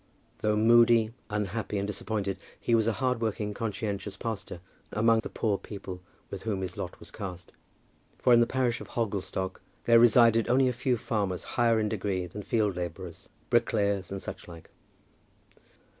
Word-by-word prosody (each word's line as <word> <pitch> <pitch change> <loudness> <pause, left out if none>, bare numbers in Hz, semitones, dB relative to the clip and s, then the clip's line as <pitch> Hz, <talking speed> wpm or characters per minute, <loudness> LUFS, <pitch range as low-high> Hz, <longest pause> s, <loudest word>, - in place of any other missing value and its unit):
Though 105 0 +1
moody, 115 0 +5 0.2
unhappy, 105 0 -2
and 100 - -1
disappointed, 105 -1 -3 0.2
he 120 - 0
was 110 -1 +4
a 115 - +2
hard 125 0 0
working, 105 -2 -2
conscientious 105 -2 -3
pastor 110 -6 -5 0.3
among 115 +1 +3
the - - -5
poor 105 -3 -1
people 95 -3 -8 0.3
with 100 - -5
whom 105 -4 -2
his 95 -1 -4
lot - - -6
was - - -12
cast; 90 -3 -7 0.7
for 125 - +4
in 120 - +7
the 120 - +4
parish 125 -2 0
of - - -8
Hogglestock 100 -4 -3 0.2
there 115 0 +6
resided 115 -1 +5
only 130 +1 +4
a 125 - +1
few 125 +1 0
farmers 100 -5 -2
higher 115 -2 +3
in 105 - +1
degree 95 -3 -2
than 95 +4 -7
field 105 -4 0
labourers, 90 0 -6 0.2
brickmakers, 100 -2 +1
and 100 - -3
such - - -7
like. 85 -2 -12
105 Hz, 165 wpm, -28 LUFS, 100-115 Hz, 0.7 s, in